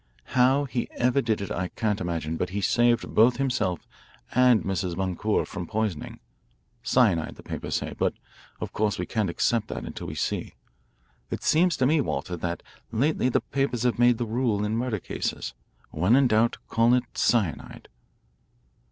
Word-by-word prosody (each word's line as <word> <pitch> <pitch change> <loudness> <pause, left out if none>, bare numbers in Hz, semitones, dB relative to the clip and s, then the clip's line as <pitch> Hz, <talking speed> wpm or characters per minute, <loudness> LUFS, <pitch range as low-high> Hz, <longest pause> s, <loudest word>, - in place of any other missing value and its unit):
How 130 +3 +4
he 125 -3 -3
ever 125 +3 +2
did 110 -4 -1
it 100 - -5
I 90 +1 -1
can't 105 +1 -2
imagine, 80 -2 -2
but 90 - -2
he 100 +3 -3
saved 120 +2 +2
both 120 +3 +5
himself 130 -10 -1 0.5
and 125 -5 +5
Mrs. 95 -2 -2
Boncour 95 +3 0
from 85 - -6
poisoning 110 -8 -3 0.6
cyanide, 115 -9 +2
the - - -14
papers - - -4
say, - - -2
but - - 0 0.4
of - - -5
course 105 -1 0
we 90 - -2
can't 110 -3 -1
accept 110 +5 +1
that - - -5
until - - -7
we - - -6
see. - - -3 0.7
It - - -4
seems 170 0 +3
to 130 - +2
me, 150 +3 +3
Walter, 90 -8 -3
that 85 0 -4 0.3
lately 130 +3 +1
the - - +1
papers 135 -4 -1
have 120 -3 +1
made 120 -1 +5
the 120 - -2
rule 110 -2 0
in 105 +1 -1
murder 120 -1 -1
cases: - - -4 0.4
When 90 +9 +3
in 135 0 +5
doubt, 115 +1 +2
call 115 +2 +4
it 125 - +1
cyanide." 105 - 0
115 Hz, 170 wpm, -26 LUFS, 95-125 Hz, 0.7 s, both